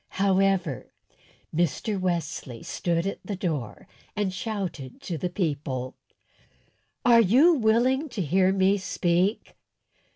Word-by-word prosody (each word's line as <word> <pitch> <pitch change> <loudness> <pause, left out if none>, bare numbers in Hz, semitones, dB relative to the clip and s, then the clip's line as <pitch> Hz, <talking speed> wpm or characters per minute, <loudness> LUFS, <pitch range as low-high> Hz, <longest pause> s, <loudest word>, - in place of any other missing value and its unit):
However, 190 - +1 0.7
Mr. 175 - 0
Wesley 170 -9 -3
stood 170 0 -1
at 195 - -3
the 205 - -4
door 155 - -4 0.3
and 205 -3 -1
shouted 185 - -5
to 175 - -4
the 175 +3 -2
people: 140 -8 -3 1.1
"Are 235 -1 +7
you 260 - +5
willing 255 +3 +2
to 240 -5 -4
hear 185 +4 +3
me 195 +1 +2
speak?" 185 +2 0
190 Hz, 110 wpm, -26 LUFS, 170-210 Hz, 1.1 s, Are